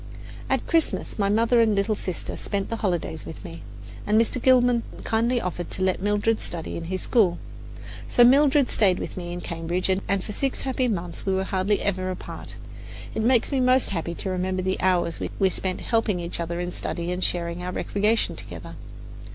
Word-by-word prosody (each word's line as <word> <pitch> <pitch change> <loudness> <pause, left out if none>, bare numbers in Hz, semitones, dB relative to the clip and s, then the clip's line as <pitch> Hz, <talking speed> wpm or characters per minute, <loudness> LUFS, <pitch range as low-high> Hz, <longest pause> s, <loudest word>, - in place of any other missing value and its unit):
At - - +1
Christmas, 330 -8 0
my 200 -1 +2
mother 230 +3 +4
and 220 -2 +3
little 200 +2 +1
sister 185 -4 -5
spent 200 0 -3
the 230 - -1
holidays 175 -6 -2
with 160 - -9
me, 85 0 -8 0.5
and 210 +1 +4
Mr. 230 +2 +1
Gilman 245 -2 +5 0.2
kindly 235 +2 +1
offered 180 -3 -4
to 185 - -2
let 185 -1 +1
Mildred 205 +2 +1
study 165 -2 -5
in 165 - -5
his 185 +2 -3
school. 190 -8 +3 0.7
So 240 - +6
Mildred 280 +2 +5
stayed 190 -4 +3
with - - -5
me 175 -1 -5
in 175 0 -5
Cambridge, 170 +3 -2
and 190 0 0
for - - -6
six 270 +5 -2
happy 260 -1 0
months 180 -6 -3
we 190 -1 +1
were 190 - +1
hardly 190 +1 0
ever 185 -2 -1
apart. 185 - -7 0.6
It - - -1
makes 240 +3 +3
me 275 - +1
most 255 -1 +3
happy 170 -2 -3
to 190 - -3
remember 185 0 -1
the 190 0 -1
hours 175 -2 +1 0.2
we 190 - +3
spent 185 0 -3
helping 225 -5 +1
each 170 0 -3
other 170 +1 -3
in 175 0 -3
study 170 0 -3
and 180 +1 -2
sharing 170 0 0
our 180 0 -3
recreation 210 +4 +1
together. - - -8
190 Hz, 190 wpm, -25 LUFS, 180-225 Hz, 0.7 s, So